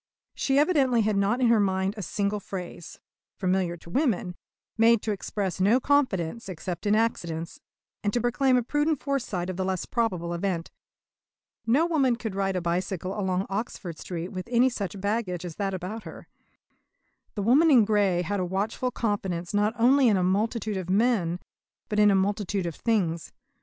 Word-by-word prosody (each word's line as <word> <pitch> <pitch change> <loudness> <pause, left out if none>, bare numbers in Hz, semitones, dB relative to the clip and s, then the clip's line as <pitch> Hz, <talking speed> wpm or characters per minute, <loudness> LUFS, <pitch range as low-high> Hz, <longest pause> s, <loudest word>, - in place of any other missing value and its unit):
She 270 0 0
evidently 280 -6 +3
had 210 0 +1
not 200 +6 +1
in 245 - +4
her 230 -2 +5
mind 190 -1 +1
a 210 - -6
single 200 +3 -1
phrase, 180 -4 -8 0.4
familiar 185 -2 0
to 170 - -15
women, 220 - 0 0.4
made 225 0 +4
to 220 - -1
express 195 -2 -3
no 215 +7 +4
confidence 235 - 0
except 180 +1 -5
in 205 - +4
accidents, 170 -7 -2 0.4
and 205 - +1
to 240 - 0
proclaim 250 +2 +2
a 245 - +1
prudent 295 +3 0
foresight 245 -11 -2
of 185 -1 -4
the 190 - -1
less 185 -1 -2
probable 180 -8 -1
event. 170 -1 -2 1.0
No 275 +9 +4
woman 280 -8 +2
could 225 -3 -5
ride 195 -1 -1
a 180 - 0
bicycle 180 +2 -2
along 190 -2 -1
Oxford 195 -5 -5
Street 175 0 -5
with 185 +1 -6
any 245 +1 +4
such 200 -5 -5
baggage 200 -3 -2
as 170 -3 -7
that 195 -1 -1
about 190 +5 -5
her. - - -11 1.1
The 205 - -2
woman 280 +10 +5
in 245 -7 +6
grey 200 -4 +2
had 200 +4 -2
a - - 0
watchful 200 +7 -1
confidence 195 -7 -2
not 210 +2 +1
only 255 +3 +5
in 210 -4 +4
a 185 - +1
multitude 210 +2 0
of 185 -1 -5
men 195 -5 +2 0.5
but 210 - 0
in 210 0 +6
a 200 - +4
multitude 200 -1 0
of 170 - -3
things. 175 -6 -1
200 Hz, 180 wpm, -26 LUFS, 185-235 Hz, 1.1 s, in